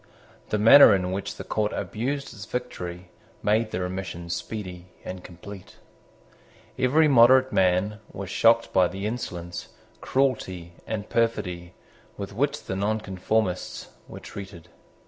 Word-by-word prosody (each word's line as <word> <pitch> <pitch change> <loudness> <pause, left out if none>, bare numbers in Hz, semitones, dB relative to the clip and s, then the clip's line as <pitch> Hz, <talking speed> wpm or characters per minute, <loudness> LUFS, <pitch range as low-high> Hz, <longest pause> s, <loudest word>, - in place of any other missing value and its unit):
The 105 - +1
manner 110 +1 +9
in 90 -1 -1
which 100 +1 -4
the - - -7
court 105 -1 -1
abused 135 +5 -3
its 105 -1 -9
victory 90 -8 -6 0.3
made 110 +2 +2
the 90 - -3
remission 90 -2 -5
speedy 90 -4 -5 0.2
and 90 0 -7
complete. 95 +2 -11 1.0
Every 150 +5 +3
moderate 130 0 +6
man 95 +3 +2
was 100 -1 -7
shocked 115 +3 +3
by 90 -1 +5
the 95 +3 -6
insolence, 90 -7 -5 0.3
cruelty, 95 -10 -1
and 105 -1 -4
perfidy 90 -7 -1 0.4
with 100 0 -6
which 140 +7 -1
the 95 - -4
Nonconformists 100 -1 -1 0.2
were - - -9
treated. 95 -4 -10
100 Hz, 125 wpm, -25 LUFS, 90-115 Hz, 1.0 s, manner